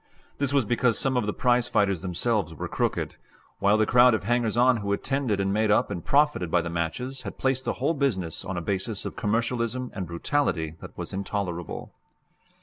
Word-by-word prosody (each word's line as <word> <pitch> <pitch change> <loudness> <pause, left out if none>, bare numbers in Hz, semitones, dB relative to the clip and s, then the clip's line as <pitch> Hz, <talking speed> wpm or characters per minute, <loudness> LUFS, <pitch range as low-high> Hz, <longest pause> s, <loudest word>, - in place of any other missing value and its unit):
This 140 -1 +1
was 140 -4 +2
because 120 +1 +2
some 135 -2 +1
of 120 -4 +1
the - - +1
prize 120 +2 +2
fighters 100 -4 +1
themselves 95 -1 -1
were - - -4
crooked, - - -2 0.4
while 100 +2 +4
the 110 - +3
crowd 125 +1 +6
of 105 - -3
hangers 120 0 +1
on 125 0 +5
who 100 -2 -3
attended 130 -1 -1
and 95 0 0
made 110 +1 +2
up 105 0 +3
and 90 -4 -4
profited 145 - +2
by 85 0 +2
the 85 - -4
matches 85 +11 -3
had - - -7
placed 130 0 0
the - - 0
whole 140 +6 0
business 95 - -1
on 95 -2 -4
a - - -2
basis 100 +4 -2
of - - -5
commercialism 120 +3 -1
and 95 -3 -4
brutality 85 - -1
that - - -11
was - - -6
intolerable. 95 -4 -4
110 Hz, 200 wpm, -26 LUFS, 95-125 Hz, 0.4 s, crowd